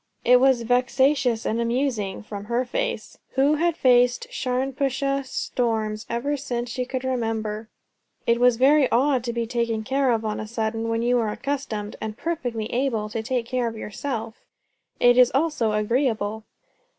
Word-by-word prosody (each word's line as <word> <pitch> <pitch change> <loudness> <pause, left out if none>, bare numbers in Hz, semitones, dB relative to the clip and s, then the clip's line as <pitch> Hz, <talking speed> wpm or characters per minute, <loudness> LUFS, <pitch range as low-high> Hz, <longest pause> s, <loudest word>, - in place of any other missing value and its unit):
It 250 0 +7
was 260 -2 +3
vexatious 250 0 +2
and 230 +2 0
amusing. 235 -5 -1
From 205 -1 -7
her 240 +3 0
face! - - -3
who 275 +3 +3
had 340 +1 +1
faced 245 -1 +4
Sharnpuashuh 270 +2 -1
storms 220 -4 -2
ever 245 +5 -1
since 245 -4 -4
she 250 0 -2
could 260 0 -4
remember. 225 -4 -2 0.6
It 235 +1 +2
is 245 -2 +5
very 275 +2 +5
odd 260 0 +2
to 240 - -1
be 235 0 -2
taken 230 -1 -1
care 270 +3 +1
of 225 -2 +1
on 215 -1 -2
a 215 - -5
sudden, 225 0 -2
when 230 0 0
you 245 +1 +3
are 220 -2 0
accustomed, 215 -4 -4
and 220 0 -5
perfectly 245 -10 -3
able, 235 -4 0
to 225 +1 -3
take 245 0 -2
care 250 0 -1
of 225 -1 -5
your 210 - -7
self. 225 -2 -5 0.6
It 245 0 +5
is 250 -1 +7
also 275 -7 +1
agreeable. 220 -1 0
245 Hz, 165 wpm, -24 LUFS, 225-265 Hz, 0.6 s, It